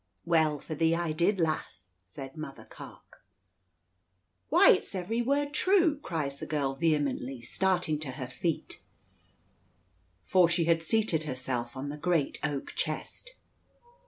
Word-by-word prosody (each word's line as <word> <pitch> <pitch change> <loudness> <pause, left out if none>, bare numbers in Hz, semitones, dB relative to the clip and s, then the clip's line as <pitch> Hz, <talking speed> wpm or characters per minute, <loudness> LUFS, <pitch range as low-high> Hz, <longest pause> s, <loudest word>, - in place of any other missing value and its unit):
"Well 160 -3 +3
for 155 - -7
thee 165 +2 +2
I 170 -1 -1
did, 175 +6 +1
lass," 100 - -2
says 135 +8 -8
Mother 155 -3 -8
Carke. - - -14 1.3
"Why, - - +7
it's - - 0
every 190 +6 -1
word 285 +4 0
true!" 345 -3 +3
cries 150 - -3
the - - -6
girl 140 -3 0
vehemently, 135 -4 0
starting 175 +1 0
to 140 -4 -5
her 130 -2 -5
feet, 160 +5 -3 1.4
for 180 - +4
she 170 -1 +1
had 165 0 +3
seated 165 -3 +1
herself 125 -3 -3
on 140 +2 -4
the 150 - -5
great 165 -2 0
oak 145 -2 -3
chest. - - -3
155 Hz, 135 wpm, -29 LUFS, 140-180 Hz, 1.4 s, Why